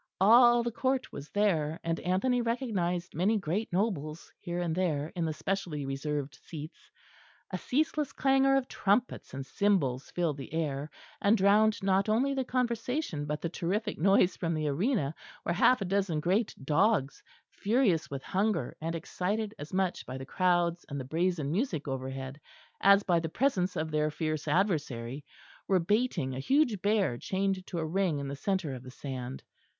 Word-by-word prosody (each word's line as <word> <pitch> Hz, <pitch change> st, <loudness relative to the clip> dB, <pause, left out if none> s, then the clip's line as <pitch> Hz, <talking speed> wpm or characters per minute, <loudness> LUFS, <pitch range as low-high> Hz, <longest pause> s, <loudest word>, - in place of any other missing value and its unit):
All 240 Hz, +4 st, +7 dB
the 235 Hz, -, -2 dB
Court 260 Hz, +2 st, -1 dB
was 140 Hz, +1 st, -8 dB
there; 165 Hz, -7 st, +1 dB
and 165 Hz, 0 st, -1 dB
Anthony 240 Hz, +8 st, +1 dB
recognised 200 Hz, -8 st, -1 dB
many 195 Hz, +7 st, +2 dB
great 195 Hz, +4 st, -2 dB
nobles 170 Hz, -5 st, -2 dB
here 175 Hz, 0 st, -4 dB
and 170 Hz, -2 st, -1 dB
there 160 Hz, -4 st, -1 dB
in 170 Hz, -2 st, -1 dB
the 160 Hz, -, -1 dB
specially 155 Hz, -2 st, -3 dB
reserved 135 Hz, 0 st, -3 dB
seats. 155 Hz, 0 st, -9 dB, 0.6 s
A -, -, -3 dB
ceaseless 300 Hz, +1 st, 0 dB
clangour 270 Hz, 0 st, +3 dB
of 270 Hz, -2 st, +1 dB
trumpets 210 Hz, +5 st, 0 dB
and 135 Hz, 0 st, -5 dB
cymbals 140 Hz, -9 st, +1 dB
filled 165 Hz, -5 st, -1 dB
the 135 Hz, +2 st, -8 dB
air, 150 Hz, -2 st, -2 dB, 0.3 s
and 205 Hz, +3 st, +4 dB
drowned 210 Hz, +2 st, +4 dB
not 195 Hz, +1 st, +2 dB
only 255 Hz, +6 st, +2 dB
the 265 Hz, -1 st, 0 dB
conversation 245 Hz, -, -1 dB
but 150 Hz, 0 st, -3 dB
the 170 Hz, -, -2 dB
terrific 185 Hz, +6 st, -2 dB
noise 195 Hz, +1 st, +4 dB
from 165 Hz, -2 st, -2 dB
the 155 Hz, -1 st, -1 dB
arena 155 Hz, -, 0 dB, 0.3 s
where 170 Hz, -, 0 dB
half 250 Hz, +6 st, +4 dB
a -, -, 0 dB
dozen 190 Hz, -4 st, 0 dB
great 190 Hz, +8 st, +1 dB
dogs, 150 Hz, 0 st, +2 dB, 0.3 s
furious 205 Hz, -7 st, +1 dB
with 135 Hz, -1 st, -5 dB
hunger 195 Hz, -1 st, 0 dB
and 165 Hz, +1 st, -2 dB
excited 205 Hz, +6 st, -2 dB
as 145 Hz, +1 st, -7 dB
much 185 Hz, -1 st, 0 dB
by 130 Hz, -, -5 dB
the 130 Hz, -, -7 dB
crowds 175 Hz, +1 st, +1 dB
and 140 Hz, -1 st, -4 dB
the 130 Hz, -, -5 dB
brazen 160 Hz, 0 st, 0 dB
music 175 Hz, -, -1 dB
overhead 135 Hz, +1 st, -5 dB, 0.4 s
as 200 Hz, +1 st, +6 dB
by 175 Hz, -3 st, +3 dB
the 165 Hz, -1 st, -3 dB
presence 190 Hz, -, +1 dB
of 155 Hz, 0 st, -2 dB
their 150 Hz, 0 st, +1 dB
fierce 155 Hz, -1 st, -3 dB
adversary, 145 Hz, -, 0 dB, 0.4 s
were 190 Hz, -, +4 dB
baiting 195 Hz, -, 0 dB
a 130 Hz, -, -4 dB
huge 245 Hz, -, +2 dB
bear 200 Hz, -, +1 dB
chained 190 Hz, 0 st, -1 dB
to 175 Hz, -, -5 dB
a 160 Hz, -, -1 dB
ring 175 Hz, -1 st, 0 dB
in 140 Hz, -1 st, -4 dB
the 140 Hz, -, -4 dB
centre 175 Hz, -1 st, -1 dB
of 125 Hz, -, -7 dB
the 130 Hz, -, -10 dB
sand. 130 Hz, -1 st, -6 dB
180 Hz, 175 wpm, -30 LUFS, 150-210 Hz, 0.6 s, All